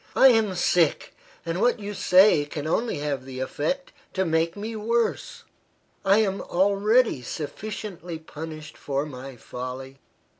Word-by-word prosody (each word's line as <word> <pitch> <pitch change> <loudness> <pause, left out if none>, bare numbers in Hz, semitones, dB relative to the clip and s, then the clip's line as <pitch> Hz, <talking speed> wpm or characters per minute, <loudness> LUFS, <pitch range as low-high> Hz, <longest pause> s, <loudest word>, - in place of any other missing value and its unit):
"I 265 - +8
am 220 -5 +3
sick, 175 -2 +2 0.3
and 170 +3 -2
what 245 0 +3
you 205 0 -5
say 185 -4 +5
can 145 0 -6
only 225 +7 0
have 145 -3 -2
the 130 -1 -8
effect 155 - -2 0.2
to 190 0 0
make 165 +2 +1
me 220 +2 -5
worse. 230 +2 -1 0.6
I 195 +1 +5
am 195 -1 -1
already 200 - +2
sufficiently 175 - -6
punished 155 -1 -9
for 140 +1 -2
my 135 -2 -8
folly. 130 +3 -7
170 Hz, 140 wpm, -25 LUFS, 145-210 Hz, 0.6 s, I